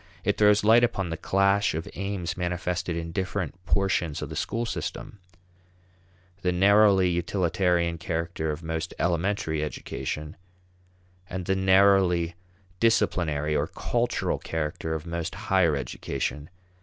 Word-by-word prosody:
It 105 Hz, -, +1 dB
throws 105 Hz, 0 st, +5 dB
light 115 Hz, +3 st, +6 dB
upon 95 Hz, -7 st, 0 dB
the -, -, -1 dB
clash 100 Hz, +2 st, +2 dB
of 80 Hz, -, -4 dB
aims 100 Hz, -2 st, -3 dB
manifested 90 Hz, 0 st, -2 dB
in 85 Hz, 0 st, -4 dB
different 95 Hz, -1 st, -3 dB
portions 90 Hz, -6 st, 0 dB
of -, -, -6 dB
the -, -, -6 dB
school 115 Hz, +1 st, -2 dB
system; 105 Hz, -2 st, -5 dB, 1.2 s
the 90 Hz, -, +1 dB
narrowly 100 Hz, 0 st, +5 dB
utilitarian 85 Hz, -1 st, 0 dB
character 85 Hz, -2 st, -3 dB
of 75 Hz, +2 st, -4 dB
most 80 Hz, +1 st, -4 dB
elementary 85 Hz, -2 st, 0 dB
education, 75 Hz, 0 st, -5 dB, 0.9 s
and 95 Hz, -1 st, -4 dB
the 95 Hz, -, +1 dB
narrowly 95 Hz, -3 st, +4 dB, 0.5 s
disciplinary 75 Hz, -9 st, +1 dB
or -, -, +1 dB
cultural -, -, -1 dB
character 80 Hz, 0 st, -3 dB
of 80 Hz, 0 st, -6 dB
most 85 Hz, -1 st, -4 dB
higher 95 Hz, -6 st, +2 dB
education. 70 Hz, +2 st, -4 dB
90 Hz, 125 wpm, -26 LUFS, 80-95 Hz, 1.2 s, light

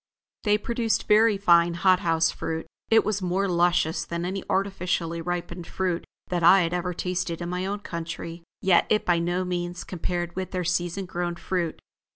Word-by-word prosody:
They 210 Hz, 0 st, +4 dB
produced 230 Hz, +1 st, -1 dB
very 215 Hz, 0 st, +5 dB
fine 170 Hz, -3 st, +4 dB
hot 185 Hz, +1 st, +4 dB
house 165 Hz, -2 st, +2 dB
fruit. 160 Hz, 0 st, -4 dB, 0.2 s
It 225 Hz, 0 st, +5 dB
was 210 Hz, -2 st, -1 dB
more 185 Hz, +2 st, 0 dB
luscious 175 Hz, -2 st, +2 dB
than 170 Hz, +1 st, -4 dB
any 190 Hz, +1 st, -3 dB
artificially 180 Hz, -4 st, -1 dB
ripened 175 Hz, 0 st, -4 dB
fruit 180 Hz, -2 st, -2 dB, 0.2 s
that 175 Hz, -1 st, -1 dB
I 185 Hz, +3 st, +7 dB
had 165 Hz, +1 st, -2 dB
ever 180 Hz, 0 st, -2 dB
tasted 180 Hz, -2 st, -2 dB
in 175 Hz, 0 st, -4 dB
my 180 Hz, +1 st, -2 dB
own 205 Hz, +1 st, -3 dB
country, 170 Hz, -1 st, -6 dB, 0.2 s
yet 185 Hz, -3 st, +4 dB
it 210 Hz, -, +2 dB
by 175 Hz, -1 st, +3 dB
no 175 Hz, +2 st, -1 dB
means 175 Hz, 0 st, -3 dB
compared 175 Hz, -1 st, -3 dB
with 185 Hz, -1 st, -3 dB
their 185 Hz, -1 st, -2 dB
season 175 Hz, +2 st, -1 dB
grown 175 Hz, -1 st, -3 dB
fruit. 170 Hz, -1 st, -2 dB
180 Hz, 180 wpm, -26 LUFS, 170-190 Hz, 0.2 s, I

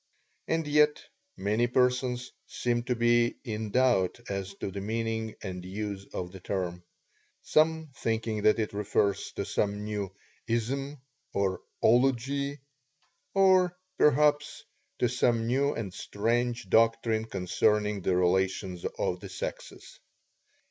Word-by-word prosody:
And 165 Hz, -1 st, 0 dB
yet, 150 Hz, 0 st, +4 dB, 0.4 s
many 110 Hz, +4 st, +1 dB
persons 125 Hz, 0 st, +1 dB, 0.2 s
seem 120 Hz, -1 st, -1 dB
to 125 Hz, 0 st, 0 dB
be 120 Hz, 0 st, +3 dB
in 110 Hz, -3 st, -4 dB
doubt 120 Hz, -5 st, +2 dB
as 100 Hz, 0 st, -4 dB
to 100 Hz, -, -5 dB
the 100 Hz, +1 st, -5 dB
meaning 110 Hz, +1 st, -2 dB
and 90 Hz, -3 st, -5 dB
use 100 Hz, +1 st, -5 dB
of 90 Hz, -1 st, -4 dB
the 95 Hz, -, -10 dB
term; 90 Hz, -2 st, -3 dB, 0.6 s
some 160 Hz, -1 st, +2 dB
thinking 110 Hz, -1 st, -1 dB
that 105 Hz, -, +4 dB
it 110 Hz, -2 st, -2 dB
refers 100 Hz, -1 st, 0 dB
to -, -, -3 dB
some 105 Hz, 0 st, -1 dB
new 105 Hz, -2 st, -3 dB, 0.4 s
"ism" 135 Hz, +5 st, -2 dB, 0.4 s
or 95 Hz, -2 st, 0 dB, 0.2 s
"ology," 135 Hz, +3 st, +2 dB, 0.7 s
or 185 Hz, -2 st, +4 dB, 0.2 s
perhaps 150 Hz, +1 st, +3 dB, 0.3 s
to 125 Hz, -, +2 dB
some 120 Hz, -1 st, +1 dB
new 135 Hz, +4 st, +1 dB
and 100 Hz, -5 st, -4 dB
strange 120 Hz, +2 st, -1 dB
doctrine 115 Hz, +1 st, +3 dB
concerning 105 Hz, +1 st, +1 dB
the 90 Hz, +1 st, +1 dB
relations 95 Hz, 0 st, +1 dB
of -, -, -1 dB
the -, -, -9 dB
sexes. -, -, -7 dB
115 Hz, 125 wpm, -29 LUFS, 100-125 Hz, 0.7 s, yet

